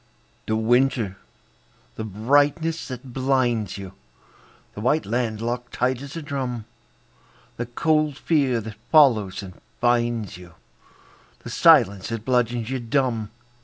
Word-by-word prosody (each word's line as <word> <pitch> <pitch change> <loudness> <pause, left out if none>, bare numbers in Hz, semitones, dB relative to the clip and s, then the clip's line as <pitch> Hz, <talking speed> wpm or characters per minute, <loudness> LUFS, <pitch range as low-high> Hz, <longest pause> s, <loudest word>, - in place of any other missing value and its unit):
The 110 - +1
winter! 115 -3 +1 0.8
the 110 - -6
brightness 145 - +1
that 125 -1 -8
blinds 125 -6 0
you, 95 -2 -8 0.8
The 105 - -7
white 150 +7 +1
land 110 -1 -2
locked 120 +1 -4
tight 130 0 0
as 140 +2 -9
a 165 - -5
drum, 130 -6 -4 0.9
The 120 - -3
cold 155 +3 +1
fear 140 -8 +1
that 110 0 -9
follows 115 - +4
and 90 -2 -11 0.2
finds 120 -4 0
you, 90 -2 -14 0.9
The - - -8
silence 115 - +5
that 115 -1 -5
bludgeons 120 -2 0
you 130 - -1
dumb. 120 -3 -1
120 Hz, 130 wpm, -23 LUFS, 110-135 Hz, 0.9 s, silence